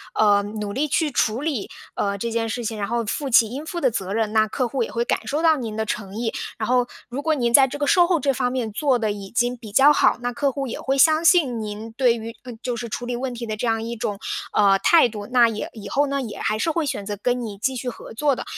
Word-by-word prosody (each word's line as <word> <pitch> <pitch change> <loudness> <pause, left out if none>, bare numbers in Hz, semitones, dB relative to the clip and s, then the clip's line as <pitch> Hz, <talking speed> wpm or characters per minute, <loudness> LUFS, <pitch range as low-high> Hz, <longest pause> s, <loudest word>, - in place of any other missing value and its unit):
呃， 205 -1 +4
努 205 0 -5
力 300 +5 0
去 300 +1 0
处 235 +1 0
理， 285 -10 -2 0.2
呃， 200 -1 -1
这 230 +3 -3
件 225 0 -1
事 240 +2 -3
情， 215 -1 -3
然 200 - -2
后 235 -1 -1
负 275 +6 -3
起 230 -2 +6
应 275 +5 -6
负 345 +2 -5
的 260 -5 +2
责 195 -2 -3
任， 220 -1 0
那 220 0 +4
客 255 +2 -1
户 255 +1 -3
也 - - -2
会 235 +1 -1
感 - - -1
受 305 +4 -1
到 320 -1 +5
您 225 -4 -5
的 220 - -1
诚 200 -2 -4
意。 230 -1 -2 0.2
然 220 - -3
后， 250 -1 +2 0.2
如 265 +4 -4
果 315 0 +1
您 240 -3 0
在 270 -1 +7
这 280 - -6
个 290 - -1
售 355 -1 +5
后 350 -2 +2
这 275 -2 +1
方 250 -1 -1
面 245 -4 -2
做 270 +2 +1
得 215 -2 -1
已 200 -1 -7
经 245 +1 0
比 225 -4 -11
较 275 +7 +6
好， - - +3
那 245 0 -2
客 280 +2 0
户 275 +1 -3
也 240 - -5
会 270 0 -1
相 315 +3 +5
信 315 -9 +4
您， 215 +1 -6
对 240 0 +2
于 230 0 -7
嗯， 245 -3 -8
就 245 -2 -2
是 235 0 -5
处 245 - -4
理 245 0 -3
问 255 0 -3
题 235 - -5
的 215 -1 -3
这 235 - -2
样 225 0 0
一 235 +1 -4
种， 205 -2 -3 0.3
呃， 195 -2 +4
态 335 -6 +5
度， 210 -2 -7
那 245 -2 +5
也 215 -1 -4
以 215 -3 -9
后 285 +1 +1
呢， 280 0 -1
也 225 -4 -6
还 215 - 0
是 325 +9 0
会 320 -1 -1
选 205 -7 -3
择 205 -1 -4
跟 245 0 0
你 210 -3 -6
继 260 +6 -1
续 250 0 -5
合 225 - -10
作 280 +3 +1
的。 - - -5
240 Hz, 305 characters per minute, -22 LUFS, 220-270 Hz, 0.3 s, 在